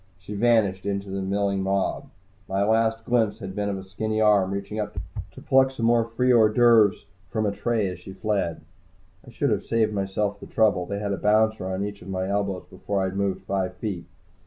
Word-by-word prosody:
She 95 +3 -9
vanished 100 -3 +2
into 100 -1 -3
the 95 0 -2
milling 100 0 0
mob. 95 0 -1 0.4
My 95 +1 +1
last 110 +1 +1
glimpse 115 -4 +1
had 95 -1 -7
been 100 +1 -2
of 100 - -2
a 95 - -7
skinny 110 +3 -3
arm 105 -3 +4
reaching 100 +2 -4
up 105 -1 -4 0.4
to - - -11
pluck 130 0 +4
some 130 -4 -3
more 115 0 +4
free 125 +2 +1
hors 110 -2 +5
d'oeuvres 115 -4 +5 0.2
from 110 0 -1
a 100 - +1
tray 110 0 0
as 90 -1 -6
she 95 +2 -10
fled. 100 -6 -2 0.7
I - - -10
should - - -1
have - - 0
saved 110 -2 +1
myself 100 +1 -1
the - - -10
trouble. 100 -5 +2
They 100 - -3
had 100 -1 -2
a - - -2
bouncer 110 0 +2
on 95 +1 -2
each 105 0 -7
of 90 - -10
my 95 0 -2
elbows 100 -2 -2
before 100 +2 -3
I 95 - 0
had 95 - -8
moved 100 -1 -1
five 95 -2 -2
feet. 95 -4 -4
100 Hz, 215 wpm, -25 LUFS, 95-110 Hz, 0.7 s, hors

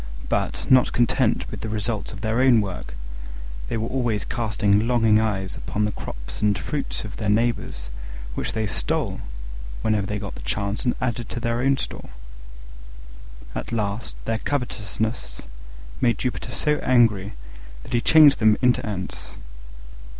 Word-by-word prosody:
But, - - -1
not 130 -1 +5
content 120 -1 +2
with - - -6
the 110 - -3
results 110 0 -1
of 100 - -8
their 115 +2 +1
own 130 -3 +6
work, 90 - -4 0.7
they - - -1
were 110 +1 -1
always 120 -5 0
casting 110 -2 +1
longing 115 -3 +4
eyes 95 -4 -1
upon 105 0 -1
the 105 - 0
crops - - -7
and 105 -1 +3
fruits 145 -2 -3
of 105 -1 -7
their 105 -2 -1
neighbours, 105 - 0 0.4
which - - -2
they 110 -1 0
stole, 100 - -1 0.6
whenever 105 -3 +1
they 105 - -2
got 100 -1 -5
the - - -9
chance, 100 - -2
and 125 - +2
added 120 -2 -2
to - - -3
their 115 +1 0
own 135 +1 +3
store. - - -6 1.4
At - - -4
last 105 -1 -2
their 110 0 0
covetousness 110 - -2 0.6
made 120 -4 +3
Jupiter 125 +1 -2
so 150 +5 +1
angry 110 -6 +3 0.5
that - - -8
he 120 - +3
changed 155 -1 +7
them 110 -1 +5
into 125 -1 +3
Ants. 95 -4 -4
110 Hz, 155 wpm, -24 LUFS, 100-120 Hz, 1.4 s, changed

